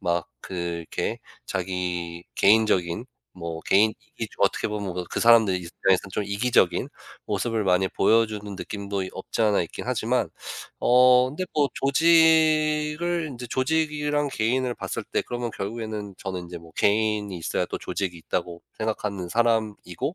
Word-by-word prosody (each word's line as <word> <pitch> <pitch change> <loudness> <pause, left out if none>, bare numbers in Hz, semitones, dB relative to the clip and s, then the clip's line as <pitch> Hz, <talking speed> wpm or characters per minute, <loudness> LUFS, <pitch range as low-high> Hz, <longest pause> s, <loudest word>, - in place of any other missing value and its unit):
막 85 0 0 0.2
그 - - -10
이렇게 85 -2 -3 0.3
자기 90 -2 -3
개인적인 100 -1 +3 0.3
뭐 85 -2 -6
개인 110 +2 +4 0.2
이기주 - - -6
어떻게 - - +2
보면 105 -3 -3
뭐 90 0 -4
그 - - -2
사람들 115 -4 +6
입장에서는 90 +2 0
좀 105 - -1
이기적인 100 -1 +2 0.4
모습을 115 -3 -1
많이 95 0 +3
보여 115 +5 +3
주는 105 -2 -6
느낌도 100 0 -4
없지 95 - -5
않아 105 -4 +3
있긴 85 - -7
하지만 - - 0 0.5
어 125 0 +6
근데 155 +7 -3
뭐 145 -2 +3
조직을 160 +1 +3
인제 125 -2 -7
조직이랑 150 +2 0
개인을 125 +3 0
봤을 - - -4
때 - - -1
그러면 120 -1 -4
결국에는 105 -1 -5
저는 95 -2 -4
인제 85 0 -8
뭐 85 -1 -16
개인이 105 -1 +1
있어야 80 - -1
또 - - -4
조직이 95 -4 -3
있다고 85 +1 -3 0.2
생각하는 105 -4 -3
사람이고 110 - 0
105 Hz, 330 characters per minute, -25 LUFS, 90-125 Hz, 0.5 s, 사람들